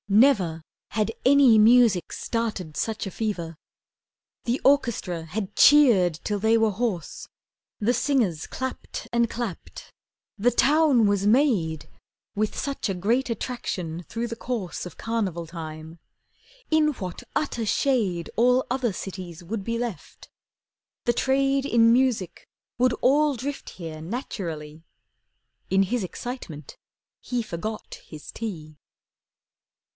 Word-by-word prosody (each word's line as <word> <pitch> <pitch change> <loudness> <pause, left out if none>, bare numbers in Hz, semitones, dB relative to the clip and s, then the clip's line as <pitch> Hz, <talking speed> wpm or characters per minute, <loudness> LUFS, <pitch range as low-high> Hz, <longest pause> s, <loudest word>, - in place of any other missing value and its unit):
Never 195 - +4 0.3
Had 215 +1 0
any 265 -4 +6
music 220 -4 +5
started 215 -9 -3
such 220 -1 -2
a 195 - -5
fever. 175 -6 -3 0.9
The 240 +3 0
orchestra 235 - +2
had 195 +4 -5
cheered 215 - +6
till 205 -1 -1
they 220 +2 +3
were 220 -1 +3
hoarse, 200 -5 -3 0.5
The 225 +4 +2
singers 230 - +1
clapped 260 0 -5
and 235 -1 +2
clapped. 230 -7 -6 0.5
The 240 +4 +3
town 280 -1 +4
was 200 0 +2
made, 210 - +2 0.5
With 215 +1 -1
such 275 -6 -2
a 195 - -1
great 235 +9 0
attraction 180 -8 -4
through 230 +6 -4
the 230 - -5
course 230 -8 -4
Of - - -13
Carnival 200 -7 -2
time. 160 0 -8 0.7
In 315 -1 +4
what 185 -8 -7
utter 240 -6 -1
shade 205 -8 0
All 250 +2 +3
other 250 -2 0
cities 180 -3 -7
would 200 +3 -4
be 230 +3 -2
left! 235 -5 -6 0.8
The 240 - +3
trade 270 +2 +1
In 230 -3 +5
music 245 -8 0 0.3
would 250 0 +3
all 290 +2 +3
drift 275 +4 -5
here 160 -3 -8
naturally. 165 - -6 0.9
In 195 +1 +4
his 235 +3 -1
excitement 180 - -7 0.5
he 245 -2 -2
forgot 215 +3 -6
his 155 -2 -10
tea. 160 -9 -7
220 Hz, 125 wpm, -25 LUFS, 180-250 Hz, 0.9 s, any